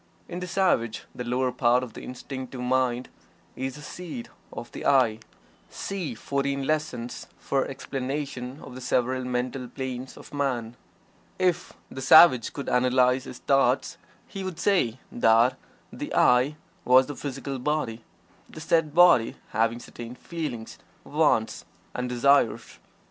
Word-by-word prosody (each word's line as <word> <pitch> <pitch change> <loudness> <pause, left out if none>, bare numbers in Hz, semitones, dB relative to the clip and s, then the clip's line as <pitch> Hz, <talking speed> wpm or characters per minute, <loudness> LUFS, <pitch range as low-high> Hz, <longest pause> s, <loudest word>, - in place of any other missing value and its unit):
In 175 - -5
the 180 - -5
savage 170 - +1
the 125 - -5
lower 125 +1 0
part 125 0 +2
of 120 -3 -8
the - - -9
Instinctive 130 0 -7
Mind 125 0 0 0.5
is 130 0 -4
the 150 - -11
seat 160 -8 -7 0.2
of - - -8
the - - -7
"I." 120 -5 +3 0.5
(See 180 -11 -4
"Fourteen 140 +2 -2
Lessons" 150 -6 -2
for 135 -1 -1
explanation 135 0 -5
of - - -10
the 130 - -9
several 130 +1 0
mental 125 +1 -2
planes 130 0 -6
of - - -13
man.) 125 -5 -2 0.6
If 180 -2 0 0.2
the 130 - -6
savage 130 -3 +7
could 140 - -6
analyze 125 +1 +3
his 125 - -8
thoughts 135 -1 +1 0.3
he 195 - -6
would 185 -3 -5
say 175 - +1
that 120 +2 +4 0.4
the - - -6
"I" 125 +4 +4 0.3
was 130 +1 +6
the 145 - -7
physical 135 -1 -5
body, 125 -5 -2 0.5
the - - -10
said 160 -1 +1
body 175 -10 +6
having 115 +2 +1
certain 120 0 -9
"feelings," 140 -8 -6 0.2
"wants" - - +1 0.3
and 125 0 -3
"desires." 125 0 +2
130 Hz, 140 wpm, -26 LUFS, 125-145 Hz, 0.6 s, savage